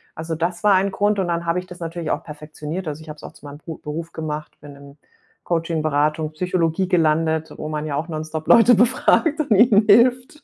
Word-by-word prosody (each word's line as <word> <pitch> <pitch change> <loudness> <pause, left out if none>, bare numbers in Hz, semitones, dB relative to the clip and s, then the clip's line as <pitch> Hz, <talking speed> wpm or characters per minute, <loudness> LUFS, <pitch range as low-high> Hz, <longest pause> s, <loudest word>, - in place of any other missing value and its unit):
Also, 160 0 -5
das 175 +3 -3
war 205 - +6
ein 190 +1 +2
Grund 205 0 0
und 185 - -1
dann 170 0 -2
habe 170 +2 0
ich 185 - -10
das 180 0 -12
natürlich 165 -1 -4
auch - - -2
perfektioniert. 155 +3 -7
Also, 150 +2 -7
ich 160 - -14
habe 150 - -7
es - - -17
auch - - -9
zu - - -17
meinem 145 +1 -10
Bru 160 0 -8
Beruf 165 +3 -7
gemacht, 155 -1 -6
bin 145 -1 -12
im 140 +1 -15 0.5
Coachin, 165 -2 -1
Beratung 150 +1 0
Psychologie 180 +1 -1
gelandet, 160 -2 +1
wo 155 - -6
man 155 0 -4
ja 145 -2 -3
auch 155 +4 -3
nonstop 155 0 -5
Leute 235 0 +6
befragt 260 - +2
und 285 -7 -2
ihnen 210 -1 +5
hilft. 250 +6 +3
165 Hz, 225 wpm, -21 LUFS, 155-190 Hz, 0.5 s, war